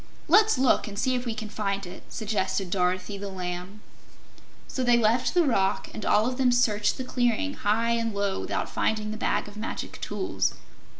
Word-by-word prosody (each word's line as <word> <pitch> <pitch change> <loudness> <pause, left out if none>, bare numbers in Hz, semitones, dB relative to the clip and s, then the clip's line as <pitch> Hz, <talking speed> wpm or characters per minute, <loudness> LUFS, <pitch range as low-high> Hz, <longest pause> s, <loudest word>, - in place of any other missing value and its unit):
"Let's 420 0 +5
look 260 -3 +3
and 200 -1 -7
see 255 +4 +1
if 250 0 -2
we 225 - -2
can 215 -1 -5
find 200 -2 -2
it," 180 +1 -9
suggested 195 -4 -1
Dorothy 185 +2 0
the 200 0 -5
Lamb. 185 +2 -6 0.8
So 260 - -2
they 240 -1 +5
left 235 +7 +2
the 350 - +5
rock, 195 -8 +1
and 215 - -6
all 210 +1 +4
of 250 +1 -2
them 255 -2 +4
searched 215 -4 +2
the 260 - -3
clearing 250 +3 0
high 230 -1 +1
and 230 -1 0
low 200 -1 -1
without - - -2
finding 215 -1 -1
the 215 - -5
Bag - - 0
of 205 0 -11
Magic 220 - -5
Tools. 375 - -1
215 Hz, 190 wpm, -27 LUFS, 200-245 Hz, 0.8 s, Let's